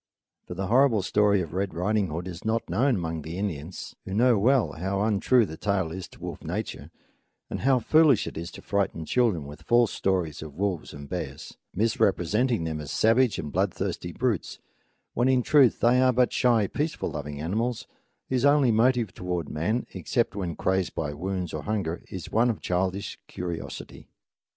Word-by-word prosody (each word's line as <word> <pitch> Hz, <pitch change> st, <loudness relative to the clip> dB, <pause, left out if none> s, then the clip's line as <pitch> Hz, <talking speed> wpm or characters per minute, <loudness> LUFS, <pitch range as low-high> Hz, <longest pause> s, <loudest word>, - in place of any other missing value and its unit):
For 90 Hz, -, -6 dB
the 95 Hz, +2 st, -2 dB
horrible 115 Hz, -1 st, +4 dB
story 100 Hz, 0 st, +3 dB
of 80 Hz, -3 st, -6 dB
Red 95 Hz, +1 st, -2 dB
Riding 100 Hz, +3 st, +1 dB
Hood 85 Hz, +3 st, -5 dB
is 90 Hz, -2 st, -8 dB
not 110 Hz, +1 st, -1 dB
known 120 Hz, +9 st, +2 dB
among 80 Hz, -3 st, -3 dB
the 80 Hz, +4 st, -6 dB
Indians, 90 Hz, -4 st, -5 dB
who 95 Hz, -, -5 dB
know 120 Hz, +2 st, +5 dB
well 120 Hz, +5 st, +3 dB
how 95 Hz, +4 st, -2 dB
untrue 110 Hz, +3 st, +3 dB
the 80 Hz, -4 st, -8 dB
tale 95 Hz, -5 st, 0 dB
is 95 Hz, +1 st, -6 dB
to -, -, -18 dB
wolf -, -, -7 dB
nature, -, -, -5 dB, 0.6 s
and -, -, -3 dB
how 135 Hz, 0 st, +3 dB
foolish 140 Hz, 0 st, +4 dB
it -, -, -7 dB
is 85 Hz, +2 st, -5 dB
to -, -, -11 dB
frighten 100 Hz, -5 st, -1 dB
children 105 Hz, -, +1 dB
with 75 Hz, +1 st, -10 dB
false 120 Hz, -2 st, +3 dB
stories 90 Hz, -6 st, -1 dB
of 75 Hz, -2 st, -9 dB
wolves 95 Hz, -3 st, -2 dB
and 70 Hz, -1 st, -9 dB
bears, 75 Hz, -5 st, -6 dB, 0.2 s
misrepresenting 105 Hz, +1 st, +1 dB
them 80 Hz, -1 st, -3 dB
as 75 Hz, -, -8 dB
savage 115 Hz, -, +3 dB
and 75 Hz, -, -5 dB
bloodthirsty 95 Hz, -1 st, -2 dB
brutes, 115 Hz, -3 st, -1 dB, 0.6 s
when 120 Hz, +2 st, +2 dB
in 130 Hz, -1 st, +3 dB
truth 140 Hz, -3 st, +4 dB
they 125 Hz, +2 st, +4 dB
are 130 Hz, 0 st, +5 dB
but 125 Hz, 0 st, +2 dB
shy, 120 Hz, -4 st, +3 dB
peace 150 Hz, -, -2 dB
loving 75 Hz, -1 st, -4 dB
animals, 110 Hz, +9 st, -2 dB, 0.4 s
whose 130 Hz, -1 st, 0 dB
only 140 Hz, -3 st, +5 dB
motive 115 Hz, -2 st, +2 dB
toward 90 Hz, -3 st, -3 dB
man, 110 Hz, +11 st, -1 dB
except 120 Hz, -5 st, -1 dB
when 90 Hz, -5 st, -3 dB
crazed 95 Hz, -1 st, 0 dB
by 75 Hz, -2 st, -2 dB
wounds 90 Hz, +3 st, -3 dB
or 75 Hz, -, -3 dB
hunger, 95 Hz, -5 st, -2 dB
is 95 Hz, -3 st, -7 dB
one 115 Hz, +3 st, +3 dB
of 115 Hz, -, -2 dB
childish 95 Hz, +2 st, -2 dB
curiosity. 85 Hz, -2 st, -6 dB
100 Hz, 180 wpm, -26 LUFS, 85-120 Hz, 0.6 s, know